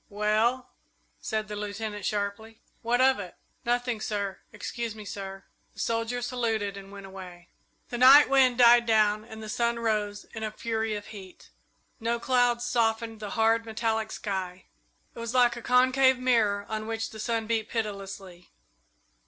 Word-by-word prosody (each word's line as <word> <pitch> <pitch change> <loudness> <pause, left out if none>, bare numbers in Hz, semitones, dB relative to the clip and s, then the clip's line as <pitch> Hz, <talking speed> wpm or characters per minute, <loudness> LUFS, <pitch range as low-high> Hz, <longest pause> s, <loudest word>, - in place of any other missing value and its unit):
"Well," 215 +5 0 0.5
said 215 0 -3
the 210 - -6
Lieutenant, 210 0 -4
sharply, 210 +2 -3 0.2
"what 240 +2 +1
of 260 -2 +4
it?" 185 -3 -8 0.3
"Nothing, 240 -2 -1
sir 200 -3 -3
excuse 235 -2 -5
me, 215 -1 -10
sir." 195 -1 -7 0.3
The - - -13
soldier 230 +2 -1
saluted 225 -5 -1
and 195 0 -10
went 200 -1 -10
away. 180 -3 -11 0.4
The 240 - -4
night 270 +4 +9
wind 260 -2 +4
died 240 -1 +6
down 215 -1 +3
and 220 0 -10
the - - -7
sun 235 +2 0
rose 210 -3 -1
in 220 - -6
a 215 - -2
fury 220 0 -2
of 205 0 -6
heat. 190 -4 -12 0.5
No 235 +1 -1
clouds 245 -1 +2
softened 225 -2 0
the 210 -1 -6
hard, 225 +1 +3
metallic 220 -1 -2
sky 190 -3 -4 0.5
it - - -11
was 230 +1 -4
like 245 -1 +4
a 240 - -7
concave 255 +2 +4
mirror 225 -5 +2
on 215 0 -4
which 225 0 -3
the 220 - -10
sun 225 0 -1
beat 220 -1 -1
pitilessly. 195 -5 -5
220 Hz, 160 wpm, -27 LUFS, 205-235 Hz, 0.5 s, night